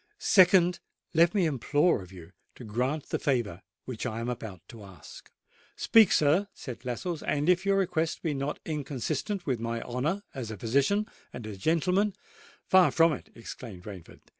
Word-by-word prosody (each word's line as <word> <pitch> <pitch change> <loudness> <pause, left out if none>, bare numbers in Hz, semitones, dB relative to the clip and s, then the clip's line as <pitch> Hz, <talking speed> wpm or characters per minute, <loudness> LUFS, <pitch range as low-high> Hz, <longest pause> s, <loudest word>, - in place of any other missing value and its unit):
"Secondly, 180 - +5 0.3
let 170 +3 +4
me 190 -4 +3
implore 150 - +2
of 90 0 -12
you 90 -2 -12 0.2
to - - -11
grant 125 +7 -2
the - - -1
favour 115 -10 -1 0.2
which 125 -4 -6
I 115 -1 -4
am 115 +1 -3
about 110 -7 -7
to 115 -3 -11
ask." 95 -2 -13 0.5
"Speak, 220 -4 +5
sir," 155 +7 +3
said 125 -2 -8
Lascelles; 150 +7 -4
"and 150 +1 -1
if 180 +2 +3
your 195 0 +3
request 165 -4 -1
be 160 -3 0
not 140 +1 -3
inconsistent 155 - -3
with 130 -5 -1
my 115 0 -3
honour 150 +12 -2
as 130 -5 -5
a 110 - -6
physician 140 - +1 0.3
and 115 - -8
as 105 -2 -7
a - - -18
gentleman——" 180 - +1 0.5
"Far 185 -1 +5
from 165 -1 +4
it!" - - -8
exclaimed 115 -4 -9
Rainford. 95 -5 -11
140 Hz, 175 wpm, -28 LUFS, 115-175 Hz, 0.5 s, Secondly